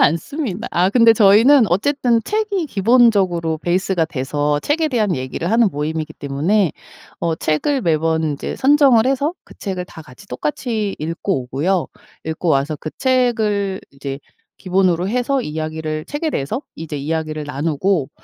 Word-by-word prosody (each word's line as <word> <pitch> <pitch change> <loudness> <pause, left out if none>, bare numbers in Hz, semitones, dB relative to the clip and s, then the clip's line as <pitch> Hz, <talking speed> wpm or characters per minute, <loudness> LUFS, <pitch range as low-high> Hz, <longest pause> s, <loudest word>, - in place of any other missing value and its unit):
않습니다. 220 - 0
아 180 +2 +2
근데 230 +2 +6
저희는 225 +5 +6
어쨌든 240 - +1
책이 415 - -1
기본적으로 195 - +2
베이스가 175 0 0
돼서 145 0 -1
책에 315 +2 0
대한 215 - 0
얘기를 130 +7 -4
하는 230 -1 +4
모임이기 155 +1 -3
때문에 160 +7 0 0.5
어 165 -1 0
책을 255 - 0
매번 160 -1 +1
인제 150 -3 -3
선정을 270 -4 +4
해서 280 +5 0
그 - - -16
책을 185 -3 -4
다 160 -3 -12
같이 125 -4 -16
똑같이 205 - -2
읽고 165 -1 -2
오고요. 160 +8 -1 0.4
읽고 160 +2 -3
와서 145 +1 +1
그 155 - -6
책을 220 -7 +1
이제 140 0 -6 0.4
기본으로 185 -1 +1
해서 250 +3 0
이야기를 155 -2 -4
책에 295 +2 -3
대해서 225 - -2
이제 160 -2 -7
이야기를 155 +1 -3
나누고 145 +2 -1
180 Hz, 330 characters per minute, -19 LUFS, 155-235 Hz, 0.5 s, 근데